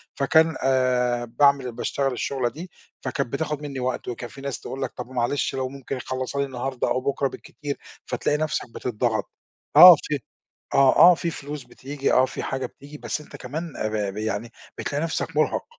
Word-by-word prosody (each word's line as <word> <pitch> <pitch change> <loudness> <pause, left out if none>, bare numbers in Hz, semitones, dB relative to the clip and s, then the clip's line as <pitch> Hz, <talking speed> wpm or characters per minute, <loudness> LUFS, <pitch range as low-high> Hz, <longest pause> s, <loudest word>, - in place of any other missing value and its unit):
فكان 160 +4 +3
آآ، 125 -2 +2
باعمل 135 +1 +3
باشتغل 135 +3 -1
الشُغلة 130 -1 -1
دي، 170 +8 -9 0.3
فكانت 140 -2 -3
بتاخد 150 0 -2
مني 140 -3 -5
وقت، 125 0 -2
وكان 120 0 -5
في 135 - -12
ناس 140 -2 -4
تقول 135 +1 -7
لَك - - -2
طَب 125 -1 -5
ومعلش 130 +2 -1
لو 130 -1 -2
ممكن 135 0 -6
يخلّصها 130 +2 -4
لي - - +1
النهارده 130 0 -3
أو 130 - 0
بُكرة 140 +1 0
بالكتير، 145 +1 -7 0.3
فتلاقي 150 - 0
نَفْسك 155 0 -1
بتضّغط، 115 -2 -1 0.4
آه 180 -1 +12
في 150 -2 -2 0.6
آه، 135 -1 +5 0.2
آه، - - +3
في 170 0 -2
فلوس 145 -2 -7
بتيجي 140 +1 -3
آه 130 - +5
في - - -6
حاجة 135 0 -2
بتيجي، 145 +2 -13
بس - - -3
أنت 150 - -11
كمان 155 +5 -6 0.2
ب 105 -2 -1
ب - - -12
يعني 110 +1 -3 0.3
بتلاقي 145 +3 -2
نَفْسك 165 - -3
مرهَق، - - +1
135 Hz, 180 wpm, -24 LUFS, 125-145 Hz, 0.6 s, آه